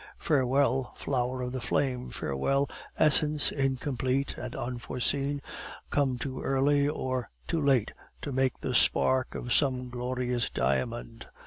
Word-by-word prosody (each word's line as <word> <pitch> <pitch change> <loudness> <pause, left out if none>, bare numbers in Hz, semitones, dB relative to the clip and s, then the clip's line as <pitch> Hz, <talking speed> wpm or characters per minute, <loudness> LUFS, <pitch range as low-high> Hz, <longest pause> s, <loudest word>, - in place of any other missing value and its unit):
Farewell, 135 -2 +1
flower 125 -1 -1
of 125 - -3
the 130 -1 -4
flame! 125 0 -1
Farewell, 135 - 0 0.3
essence 150 0 +4
incomplete 135 0 -1
and 125 0 -6
unforeseen, 130 +4 -2 0.5
come 135 -3 +1
too 130 +2 -4
early 140 +1 +2
or 130 -4 -2 0.2
too 165 -2 0
late 135 -6 +3 0.3
to 145 - -3
make 130 -1 +1
the - - -2
spark 130 -1 +3
of 120 - -2
some 125 -3 +1
glorious 125 -1 -1
diamond." 65 -2 -2
130 Hz, 125 wpm, -29 LUFS, 125-140 Hz, 0.5 s, essence